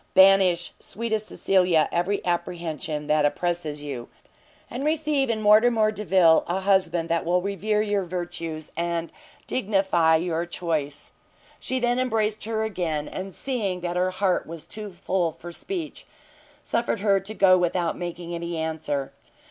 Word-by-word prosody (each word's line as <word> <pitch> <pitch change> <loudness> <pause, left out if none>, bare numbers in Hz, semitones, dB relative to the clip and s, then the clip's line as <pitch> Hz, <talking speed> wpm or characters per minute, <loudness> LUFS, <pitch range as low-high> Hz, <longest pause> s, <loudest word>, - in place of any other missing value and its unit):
banish, 190 -2 +5
sweetest 220 -1 -2
Cecilia, 180 -5 +2
every 180 +4 0
apprehension 170 -3 -3
that 150 0 +2
oppresses 150 0 -1
you, 135 -5 -6 0.6
and 250 +3 -5
receive 300 -3 +1
in 225 -2 0
Mortimer 215 +1 +5
Delvile 185 -6 +4
a 185 +3 -1
husband 185 -4 +2
that 170 0 +1
will 175 +2 +2
revere 210 +2 0
your 205 -2 0
virtues, 165 -3 -5
and 170 0 -2 0.3
dignify 190 -8 +2
your 170 0 -1
choice!" 155 -5 -3 0.5
She 260 - -2
then 245 0 +1
embraced 220 -4 0
her 220 0 -1
again, 170 -8 -2
and 190 -1 -6
seeing 205 -9 -2
that 175 0 -3
her 180 +1 +2
heart 185 0 0
was 165 -1 -8
too 210 -1 -7
full 175 -1 -1
for 175 +2 -10
speech, 340 - -6 0.6
suffered 230 -3 -1
her 200 -2 +3
to 195 +3 -7
go 190 -3 +6
without 175 -1 0
making 175 -1 -6
any 170 0 -4
answer. 150 -4 -3
180 Hz, 145 wpm, -25 LUFS, 165-210 Hz, 0.6 s, go